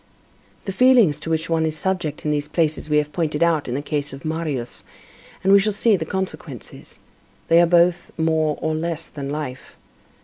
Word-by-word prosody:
The 195 Hz, -, -2 dB
feelings 225 Hz, -, +4 dB
to 160 Hz, -, -6 dB
which 160 Hz, 0 st, -1 dB
one 165 Hz, -1 st, +1 dB
is 160 Hz, -1 st, -1 dB
subject 170 Hz, -4 st, -2 dB
in 150 Hz, -, +1 dB
these 145 Hz, 0 st, -1 dB
places 155 Hz, -1 st, -1 dB
we 150 Hz, -, +3 dB
have 150 Hz, 0 st, 0 dB
pointed 155 Hz, -1 st, 0 dB
out 165 Hz, -3 st, +1 dB
in 120 Hz, -, -2 dB
the 140 Hz, -, -3 dB
case 145 Hz, -2 st, -3 dB
of 135 Hz, +3 st, -10 dB
Marius, 155 Hz, -6 st, -3 dB, 0.6 s
and 195 Hz, +1 st, +4 dB
we 200 Hz, -, +8 dB
shall 210 Hz, +2 st, +1 dB
see 210 Hz, +2 st, +3 dB
the 160 Hz, -4 st, -3 dB
consequences; 165 Hz, -, -6 dB, 0.5 s
they 165 Hz, +1 st, +6 dB
are 175 Hz, -, +4 dB
both 175 Hz, 0 st, +3 dB
more 160 Hz, -2 st, +1 dB
and 155 Hz, 0 st, -1 dB
less 165 Hz, -1 st, -4 dB
than 140 Hz, -2 st, -6 dB
life. 145 Hz, -3 st, -6 dB
160 Hz, 195 wpm, -22 LUFS, 150-170 Hz, 0.6 s, we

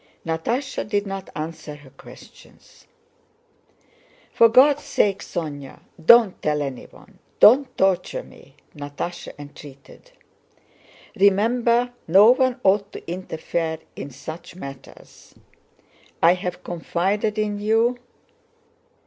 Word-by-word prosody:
Natásha 230 Hz, -, -2 dB
did 205 Hz, -1 st, -1 dB
not 195 Hz, -1 st, -6 dB
answer 155 Hz, -1 st, -6 dB
her 145 Hz, -2 st, -17 dB
questions. -, -, -17 dB, 1.5 s
"For 230 Hz, -, +6 dB
God's 275 Hz, +5 st, +5 dB
sake, 200 Hz, -7 st, 0 dB
Sónya, 145 Hz, -8 st, -6 dB, 0.2 s
don't 225 Hz, +1 st, +6 dB
tell 150 Hz, -1 st, 0 dB
anyone, 135 Hz, -3 st, -10 dB, 0.2 s
don't 260 Hz, +5 st, +5 dB
torture 190 Hz, -, 0 dB
me," -, -, -18 dB, 0.2 s
Natásha 145 Hz, +4 st, -6 dB
entreated. 145 Hz, -, -14 dB, 1.1 s
"Remember 235 Hz, +5 st, +2 dB
no 195 Hz, +7 st, +7 dB
one 255 Hz, 0 st, +1 dB
ought 200 Hz, +1 st, +2 dB
to -, -, -10 dB
interfere 165 Hz, -2 st, -3 dB, 0.2 s
in -, -, -7 dB
such 160 Hz, +6 st, -10 dB
matters! 140 Hz, -7 st, -12 dB, 0.8 s
I 170 Hz, +1 st, +5 dB
have 180 Hz, 0 st, -5 dB
confided 195 Hz, +5 st, -2 dB
in 210 Hz, -1 st, -1 dB
you...." 225 Hz, +4 st, +1 dB
190 Hz, 100 wpm, -22 LUFS, 160-225 Hz, 1.5 s, no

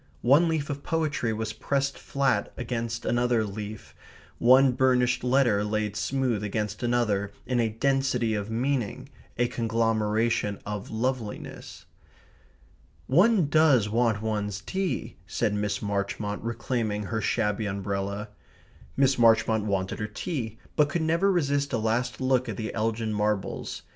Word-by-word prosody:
One 145 Hz, +8 st, +5 dB
leaf 155 Hz, -3 st, -1 dB
of 140 Hz, 0 st, -5 dB
poetry 150 Hz, -8 st, -1 dB
was 110 Hz, 0 st, -3 dB
pressed 140 Hz, +4 st, -1 dB
flat 135 Hz, -7 st, 0 dB
against 115 Hz, -1 st, -3 dB
another 120 Hz, -1 st, +2 dB
leaf, 105 Hz, +1 st, -7 dB, 0.5 s
one 130 Hz, +2 st, +6 dB
burnished 125 Hz, -1 st, +2 dB
letter 125 Hz, -5 st, +3 dB
laid 105 Hz, 0 st, -1 dB
smooth 125 Hz, -1 st, -1 dB
against 105 Hz, 0 st, -3 dB
another 110 Hz, -5 st, +1 dB
in 125 Hz, -1 st, 0 dB
a 115 Hz, -1 st, +2 dB
density 125 Hz, -1 st, +1 dB
of 105 Hz, 0 st, -3 dB
meaning, 120 Hz, -1 st, -2 dB, 0.3 s
a 120 Hz, +1 st, +2 dB
conglomeration 115 Hz, -2 st, 0 dB
of 105 Hz, -1 st, -5 dB
loveliness. 115 Hz, -1 st, -4 dB, 1.2 s
"One 185 Hz, -, +4 dB
does 145 Hz, -8 st, +4 dB
want 110 Hz, -1 st, +1 dB
one's 105 Hz, -2 st, -2 dB
tea," 190 Hz, -, -3 dB
said 105 Hz, -, 0 dB
Miss 105 Hz, 0 st, -2 dB
Marchmont, 100 Hz, 0 st, -2 dB
reclaiming 115 Hz, -2 st, -2 dB
her 110 Hz, +2 st, -2 dB
shabby 105 Hz, 0 st, 0 dB
umbrella. 100 Hz, +1 st, -3 dB, 0.7 s
Miss 135 Hz, -2 st, +3 dB
Marchmont 110 Hz, -2 st, +4 dB
wanted 95 Hz, -2 st, -1 dB
her 105 Hz, -, -2 dB
tea, 115 Hz, -, -4 dB, 0.2 s
but 150 Hz, -1 st, +3 dB
could 165 Hz, +2 st, -1 dB
never 170 Hz, +5 st, +2 dB
resist 140 Hz, -5 st, 0 dB
a -, -, +2 dB
last 115 Hz, +3 st, -1 dB
look 130 Hz, -2 st, +1 dB
at 105 Hz, -, -4 dB
the 110 Hz, -, -4 dB
Elgin 110 Hz, 0 st, -1 dB
Marbles. 105 Hz, -1 st, -2 dB
115 Hz, 135 wpm, -27 LUFS, 105-130 Hz, 1.2 s, one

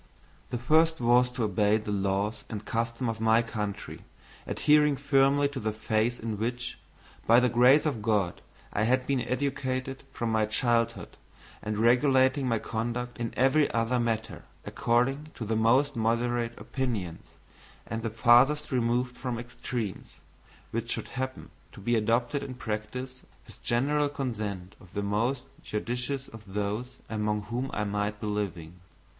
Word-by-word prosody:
The 125 Hz, -, -2 dB
first 160 Hz, +6 st, +3 dB
was 120 Hz, +1 st, +4 dB
to 125 Hz, -, -2 dB
obey 105 Hz, +1 st, +3 dB
the 105 Hz, -1 st, -5 dB
laws 100 Hz, +2 st, -1 dB
and 105 Hz, -1 st, -6 dB
customs 115 Hz, +3 st, -1 dB
of 110 Hz, 0 st, -8 dB
my 115 Hz, +1 st, +4 dB
country, 105 Hz, -3 st, -5 dB, 0.5 s
adhering 150 Hz, -1 st, +4 dB
firmly 140 Hz, +1 st, +3 dB
to 140 Hz, -2 st, -5 dB
the 110 Hz, -2 st, -1 dB
faith 110 Hz, +2 st, 0 dB
in 110 Hz, -2 st, -4 dB
which, 120 Hz, +2 st, -3 dB, 0.5 s
by 115 Hz, +2 st, +7 dB
the 125 Hz, 0 st, +3 dB
grace 125 Hz, +6 st, +5 dB
of 135 Hz, -8 st, -1 dB
God, 105 Hz, -4 st, 0 dB, 0.3 s
I 110 Hz, -, +1 dB
had 130 Hz, +2 st, +2 dB
been 135 Hz, -2 st, +1 dB
educated 130 Hz, 0 st, -2 dB
from 115 Hz, -1 st, -2 dB
my 110 Hz, -1 st, +2 dB
childhood 115 Hz, +1 st, 0 dB, 0.4 s
and 105 Hz, 0 st, -3 dB
regulating 130 Hz, +3 st, +4 dB
my 115 Hz, -2 st, +2 dB
conduct 120 Hz, +3 st, -3 dB
in 115 Hz, -1 st, -2 dB
every 135 Hz, +4 st, +4 dB
other 115 Hz, +2 st, +1 dB
matter 115 Hz, -2 st, -2 dB, 0.2 s
according 135 Hz, +6 st, +1 dB
to 115 Hz, -, -5 dB
the 110 Hz, +1 st, 0 dB
most 130 Hz, +6 st, +3 dB
moderate 115 Hz, +1 st, 0 dB
opinions, 110 Hz, -11 st, -3 dB, 0.6 s
and 115 Hz, +1 st, -4 dB
the 115 Hz, -, -2 dB
farthest 120 Hz, +7 st, +4 dB
removed 125 Hz, 0 st, +1 dB
from 125 Hz, -2 st, -3 dB
extremes, 120 Hz, -3 st, -5 dB, 0.6 s
which -, -, -3 dB
should -, -, -3 dB
happen 130 Hz, 0 st, -5 dB, 0.2 s
to -, -, -11 dB
be 120 Hz, +4 st, +1 dB
adopted 120 Hz, +5 st, +1 dB
in 135 Hz, -2 st, -6 dB
practice 125 Hz, +3 st, -5 dB, 0.2 s
with -, -, -16 dB
general 145 Hz, +5 st, +1 dB
consent 105 Hz, -9 st, -4 dB
of 90 Hz, -, -17 dB
the 100 Hz, -, -1 dB
most 115 Hz, +6 st, 0 dB, 0.2 s
judicious 125 Hz, +5 st, -3 dB
of 110 Hz, -3 st, -12 dB
those 105 Hz, +5 st, -2 dB
among 105 Hz, -1 st, -1 dB
whom 120 Hz, +5 st, -3 dB
I 105 Hz, -, -1 dB
might 105 Hz, 0 st, -2 dB
be -, -, -5 dB
living. 90 Hz, -5 st, -3 dB
120 Hz, 150 wpm, -28 LUFS, 110-130 Hz, 0.6 s, by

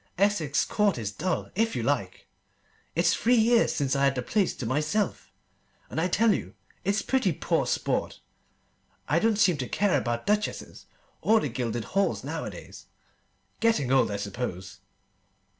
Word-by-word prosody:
Essex 175 Hz, -7 st, +2 dB
Court 205 Hz, -6 st, +1 dB
is 105 Hz, -4 st, -3 dB
dull, 180 Hz, -, -3 dB
if 225 Hz, +3 st, 0 dB
you -, -, -2 dB
like! -, -, -2 dB, 0.7 s
It's -, -, +3 dB
three 245 Hz, +2 st, +3 dB
years 230 Hz, +1 st, +4 dB
since 140 Hz, -2 st, 0 dB
I 140 Hz, 0 st, +3 dB
had 135 Hz, -1 st, +2 dB
the 125 Hz, -, -2 dB
place 200 Hz, -, 0 dB
to 125 Hz, -, -5 dB
myself, 155 Hz, -, -1 dB, 0.6 s
and 160 Hz, -, -1 dB
I 180 Hz, -, +2 dB
tell 215 Hz, +4 st, +3 dB
you -, -, -5 dB, 0.3 s
it's 200 Hz, +3 st, 0 dB
pretty 265 Hz, -1 st, +1 dB
poor -, -, 0 dB
sport. -, -, -1 dB, 0.9 s
I -, -, +2 dB
don't 225 Hz, -2 st, +2 dB
seem 185 Hz, -6 st, +3 dB
to 125 Hz, -3 st, -4 dB
care 200 Hz, -5 st, +1 dB
about 120 Hz, -2 st, -3 dB
duchesses 210 Hz, +1 st, -2 dB, 0.3 s
or 220 Hz, +1 st, +4 dB
the 150 Hz, -, -2 dB
gilded 120 Hz, -1 st, -3 dB
halls 195 Hz, -, 0 dB
nowadays. -, -, -7 dB, 0.7 s
Getting 225 Hz, -, +2 dB
old, 135 Hz, -3 st, +4 dB
I 100 Hz, -, -2 dB
suppose. 100 Hz, -2 st, -5 dB
175 Hz, 160 wpm, -27 LUFS, 125-210 Hz, 0.9 s, years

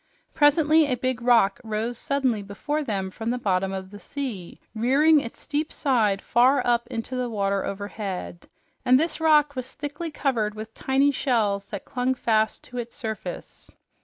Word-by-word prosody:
Presently 305 Hz, +1 st, +4 dB
a 255 Hz, -, +1 dB
big 255 Hz, 0 st, -2 dB
rock 230 Hz, -5 st, +3 dB
rose 220 Hz, +2 st, -2 dB
suddenly 260 Hz, -3 st, 0 dB
before 290 Hz, +10 st, -3 dB
them 195 Hz, -7 st, -3 dB
from 225 Hz, +4 st, -4 dB
the 245 Hz, -, 0 dB
bottom 195 Hz, -4 st, 0 dB
of 190 Hz, 0 st, -6 dB
the 205 Hz, -, -10 dB
sea, 240 Hz, -12 st, -6 dB
rearing 275 Hz, +8 st, +4 dB
its 235 Hz, -4 st, -7 dB
steep 300 Hz, +2 st, -2 dB
side 220 Hz, -8 st, +1 dB
far 255 Hz, +4 st, +3 dB
up 240 Hz, -1 st, +1 dB
into 230 Hz, +3 st, -5 dB
the 250 Hz, -1 st, -1 dB
water 200 Hz, -3 st, 0 dB
overhead, 200 Hz, -3 st, -5 dB, 0.3 s
and 255 Hz, +1 st, +5 dB
this 325 Hz, +1 st, -1 dB
rock 300 Hz, -2 st, +4 dB
was 255 Hz, 0 st, -5 dB
thickly 295 Hz, +3 st, -5 dB
covered 235 Hz, -8 st, -1 dB
with 215 Hz, +1 st, -8 dB
tiny 270 Hz, +4 st, +2 dB
shells 215 Hz, -8 st, 0 dB
that 200 Hz, -, -7 dB
clung 255 Hz, +1 st, -1 dB
fast 220 Hz, -3 st, +1 dB
to 250 Hz, -1 st, -7 dB
its 235 Hz, 0 st, -6 dB
surface. 220 Hz, -6 st, -7 dB
240 Hz, 165 wpm, -25 LUFS, 210-280 Hz, 0.3 s, and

